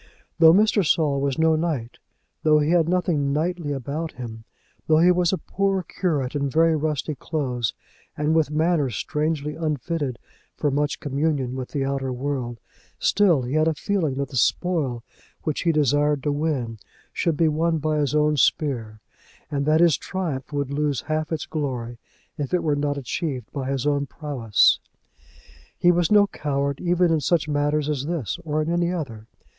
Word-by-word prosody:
Though 160 -1 +9
Mr. 210 +2 +4
Saul 150 -4 +2
was 140 -1 -1
no 160 0 +4
knight, 155 -8 -2 0.4
though 155 -1 +4
he 150 +1 +2
had 170 -2 +3
nothing 170 -6 +1
knightly 160 +1 -1
about 145 +4 -4
him, 115 -3 -8 0.4
though 155 - +5
he 175 +3 +6
was 180 -1 +2
a 190 - 0
poor 195 0 -1
curate 150 -8 -2
in 140 -1 0
very 165 +3 +3
rusty 155 0 -1
clothes 130 -7 -2 0.4
and 150 +1 +1
with 160 -3 +2
manner 155 -2 +1
strangely 150 +4 -2
unfitted 150 -4 -2 0.4
for 145 - 0
much 145 +2 0
communion 140 -2 -1
with 130 -1 -5
the 140 -2 -2
outer 135 -1 -2
world, 125 -2 -3 0.4
still 175 -10 +3
he 125 +2 -4
had 155 +1 +3
a 160 - +1
feeling 165 -5 -1
that 140 -1 -3
the 130 - -5
spoil 140 -5 0 0.4
which 155 - -2
he 170 - +2
desired 145 -1 +2
to 150 - +1
win 140 -7 -2 0.3
should 165 -3 0
be 165 - +3
won 160 +2 +1
by 155 0 0
his 145 0 0
own 150 0 +3
spear, 115 -8 0 0.5
and 140 0 -1
that 155 +2 +4
his 170 -5 +5
triumph 160 -9 -4
would 140 -2 -2
lose 145 -2 0
half 155 0 -2
its 160 -2 -2
glory 125 -6 -4 0.4
if 145 +5 -1
it 175 - 0
were 150 -3 +1
not 145 0 -1
achieved 135 -2 -4
by 135 -2 -3
his 135 -1 -1
own 145 -1 +1
prowess. 130 -9 +2 1.0
He 175 - +5
was 175 +1 +1
no 205 -1 +7
coward, 140 -6 -2
either 180 0 +2
in 165 -2 +2
such 155 +2 +1
matter 145 0 +1
as 150 -2 -2
this 165 - -3
or 155 -1 -1
in 160 - -2
any 175 0 +1
other. 115 -11 -5
150 Hz, 175 wpm, -24 LUFS, 140-165 Hz, 1.0 s, Though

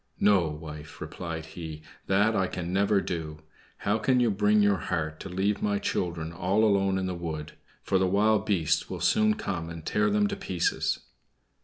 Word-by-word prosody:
"No, 100 -5 +4
wife," 75 0 -8
replied 80 -1 -5
he; 80 -1 -8 0.2
"that 105 +3 +3
I 95 -1 +2
can 90 0 -4
never 100 +1 +3
do. 80 -4 -5 0.3
How 105 +2 0
can 130 +2 +3
you 120 -3 +3
bring 105 +1 +3
your 100 -1 +3
heart 75 -3 -2
to - - -7
leave 95 +3 0
my 105 -1 +1
children 85 -4 -2
all 95 +5 +1
alone 100 -2 +3
in 95 - -1
the 95 - -2
wood; 80 -3 -5 0.3
for 95 - +2
the 95 - +2
wild 105 +2 +3
beasts 90 -7 +1
will - - -5
soon 215 0 +3
come 90 - -4
and 85 -1 -8
tear 105 0 +2
them 105 0 +3
to - - -2
pieces?" 90 -3 -1
95 Hz, 185 wpm, -28 LUFS, 80-105 Hz, 0.3 s, No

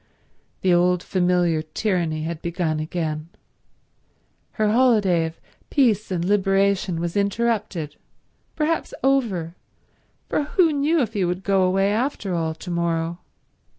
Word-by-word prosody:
The 185 -1 +3
old 180 0 +3
familiar 175 -3 +1
tyranny 160 -1 -1
had 165 0 -4
begun 170 -2 -1
again. 155 0 -3 1.2
Her 215 -2 +1
holiday 210 -9 +3
of 160 - -11 0.3
peace 225 -7 +2
and 175 -2 -1
liberation 195 -2 +1
was 170 0 -3
interrupted—perhaps 220 - -3
over, 220 -12 +1 0.7
for - - 0
who 330 0 +3
knew 295 +3 +2
if 225 -2 -4
he 200 -4 0
would 180 +2 -2
go 195 -1 +2
away, 195 +2 +2
after 225 -5 -1
all, 160 -2 -1
to 175 +2 -8
morrow? 170 0 -1
185 Hz, 120 wpm, -23 LUFS, 170-215 Hz, 1.2 s, The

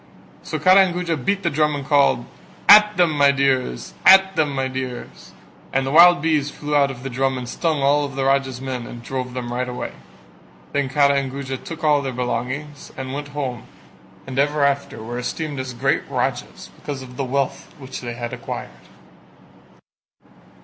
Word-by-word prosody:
So 155 - -4
Kara 185 +5 +6
and 175 - -5
Guja 175 -2 -1
beat 195 +8 -1
the 170 - 0
drum 150 0 +1
and 140 -1 -5
called 140 -4 +3 0.4
"At 210 0 +8
them, 175 -3 +4
my 145 -2 +4
dears: 130 - 0
at 190 0 +7
them 155 -2 +2
my 135 -1 0
dears." 130 -1 -7 0.4
And 135 0 0
the 135 - -2
wild 175 +1 +7
bees 150 -3 +1
flew 150 0 -4
out 140 -1 +4
of 130 -2 -8
the 135 - -4
drum 135 +1 0
and 125 -1 -6
stung 155 +2 -1 0.3
the 135 -1 -1
Raja's 135 -2 +1
men 130 -2 -5
and 120 -1 -10
drove 125 0 -5
them 120 -1 -4
right 125 +1 -2
away. 125 - -5 0.8
Then 140 -2 0
Kara 140 +1 +3
and 135 -1 -4
Guja 135 -1 -5
took 165 +4 -9
all 150 -2 +3
their 135 -1 -3
belongings 130 +4 -4
and 130 0 -5
went 145 +1 -5
home 130 -5 -4 0.6
and 135 0 -4
ever 145 +1 +2
after 140 -5 -2
were 120 +2 -5
esteemed 145 +3 -4
as 130 0 -4
great - - +1
Rajas - - -3
because 140 -3 -6
of 125 -1 -12
the 140 - -2
wealth 135 +1 -2
which 135 -2 -8
they 120 -1 -6
had 120 0 -5
acquired. - - -6
140 Hz, 185 wpm, -21 LUFS, 130-150 Hz, 0.8 s, At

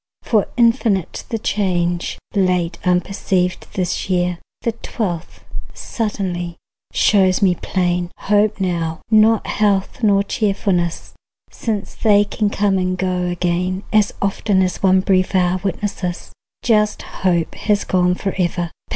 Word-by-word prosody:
For 215 -4 +2
infinite 230 - +1
The 225 - -1
change, 175 -5 -1 0.2
late 180 -4 +1
unperceived, 180 0 0
this 185 0 -2
year, 180 -1 0 0.2
The 230 - +1
twelfth, 190 -6 -5 0.3
suddenly, 185 -6 -3 0.4
shows 190 -1 +3
me 185 -2 +5
plain. 175 0 -1
Hope 210 +1 +2
now, 170 -3 -2
not 220 0 +5
health 200 -1 0
nor 200 -3 +4
cheerfulness, 195 -6 -1 0.4
Since 215 -3 -3
they 205 -2 +4
can 205 0 -1
come 200 -2 +1
and 185 0 -1
go 180 -1 -1
again, 180 +2 -1
As 210 -1 +4
often 195 -1 +2
one 190 -1 +4
brief 185 0 +1
hour 180 0 +2
witnesses, 185 -2 -3 0.3
Just 210 -3 +2 0.2
hope 175 -3 +1
has 210 -2 0
gone 180 -1 +2
forever. 175 -3 -2
190 Hz, 120 wpm, -19 LUFS, 180-205 Hz, 0.4 s, me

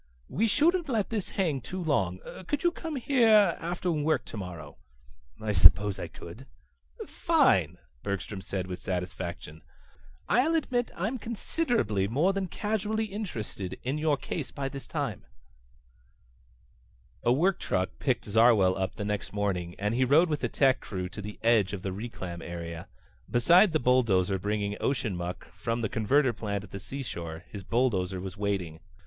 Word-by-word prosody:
"We 225 - +1
shouldn't 325 - +2
let 220 -6 0
this 215 -4 -2
hang 160 -9 +1
too 185 +11 -6
long. 95 - 0 0.3
Could 295 +2 -1
you 345 - +4
come 325 -2 -6
here 230 -6 +4
after 175 +1 -2
work 155 0 +1
tomorrow?" 90 -8 -7 0.6
"I 110 -1 -2
suppose 100 +1 +6
I - - -4
could." - - -11 0.6
"Fine," - - +2 0.2
Bergstrom 100 0 -4
said 95 -1 -3
with 90 -1 -6
satisfaction. 90 -3 -5 0.7
"I'll 255 - +3
admit 245 -6 0
I'm 220 +9 -2
considerably 225 - 0
more 150 - +2
than 195 -1 -2
casually 215 +3 -1
interested 115 - -5
in 135 +4 -1
your 150 -2 +2
case - - -4
by 135 -1 -4
this 135 0 -8
time." 140 - -3 2.0
A 120 - +2
work 175 +9 +2
truck 95 0 -2
picked 130 -4 0
Zarwell 105 -3 +5
up 95 -1 -2
the 105 - -4
next 105 -1 -3
morning 95 -4 -1
and 105 +2 -1
he 125 +2 +2
rode 155 +7 +5
with 150 -2 -2
a - - +1
tech 135 -2 +3
crew 90 -3 -5
to 105 - -7
the 105 +1 -7
edge 110 -4 +3
of 95 -3 -5
the 95 - -2
reclam 95 -5 -6
area. 85 -1 -6 0.4
Beside 175 - +5
the 155 - +2
belt 125 -1 +3 0.3
bringing 105 0 -1
ocean 115 -8 0
muck 85 +1 -6
from 115 +1 -2
the 110 - -1
converter 130 +4 +2
plant 100 -2 -3
at 100 - -13
the 100 - -6
seashore 85 -10 -6
his 100 -2 -8
bulldozer 95 -5 0
was 95 0 -6
waiting. 100 -6 -2
115 Hz, 160 wpm, -28 LUFS, -, 2.0 s, suppose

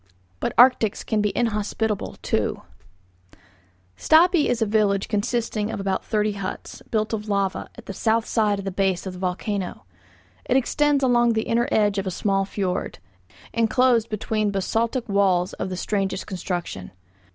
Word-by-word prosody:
BUT - - -1
ARCTICS 240 -4 +5
CAN 215 -1 0
BE 210 - +1
INHOSPITABLE, 220 -2 -1
TOO - - -1 1.3
Stapi 325 - +4
is 240 - 0
a 225 - +2
village 205 -2 +1
consisting 215 0 -1
of - - -4
about 195 -1 -1
thirty 210 -1 0
huts, 200 -2 -6
built 215 0 -1
of 210 -1 -3
lava, 200 -2 -1
at 235 - -12
the 195 - -6
south 225 +3 +1
side 210 -3 +1
of 195 - -6
the 195 - -2
base 190 -1 0
of 190 - -5
the 180 - -9
volcano. 185 +1 -3 0.6
It 255 - +2
extends 285 +2 +2
along 240 -2 +4
the 220 0 0
inner 235 +1 +1
edge 205 -2 +2
of 195 - -3
a - - +1
small 195 +1 0
fiord, 190 -2 -3 0.6
inclosed 230 0 +2
between 215 0 -1
basaltic 225 +5 -1
walls 190 -3 +2
of - - -4
the 185 - -4
strangest 195 0 -2
construction. 175 - -4
210 Hz, 160 wpm, -23 LUFS, 195-230 Hz, 1.3 s, ARCTICS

